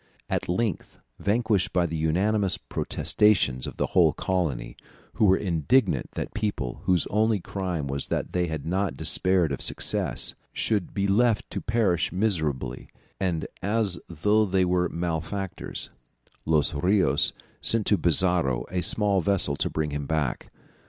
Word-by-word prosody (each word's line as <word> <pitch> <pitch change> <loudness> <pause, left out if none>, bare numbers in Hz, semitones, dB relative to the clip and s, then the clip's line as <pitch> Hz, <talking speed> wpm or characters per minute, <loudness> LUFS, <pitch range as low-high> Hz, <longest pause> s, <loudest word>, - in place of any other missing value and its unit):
At - - -2
length, 100 0 -2 0.2
vanquished 105 -4 +1
by 90 -1 +2
the 80 -1 -4
unanimous 95 +6 +1
protestations 85 -12 +1
of - - -8
the - - +1
whole - - +5
colony, 90 -9 -2 0.4
who 110 - +2
were 95 -1 +5
indignant 95 - +1
that - - -5
people 100 - -3
whose 90 -3 +2
only 110 0 +2
crime 90 -4 -4
was 70 0 -4
that - - -3
they 90 -1 +1
had 80 -3 -5
not 95 +2 -1
despaired 90 -4 +2
of 70 - -3
success, - - 0 0.2
should 105 -5 -1
be 100 - 0
left 110 +2 +2
to - - -4
perish 110 -7 +1
miserably 80 -8 -2 0.3
and 90 -4 -1 0.2
as 100 -3 0
though 105 +7 +2
they 95 -1 +1
were 90 0 +1
malefactors, 85 +3 -2 0.6
Los 80 -3 +2
Rios 90 -2 +3 0.3
sent 115 -2 +3
to 105 - +4
Pizarro 85 -7 +2
a 90 -1 -1
small 100 0 +3
vessel 95 -6 +1
to - - -1
bring 75 -1 -2
him 70 -1 -4
back. 75 -6 -2
90 Hz, 145 wpm, -26 LUFS, 80-100 Hz, 0.6 s, whole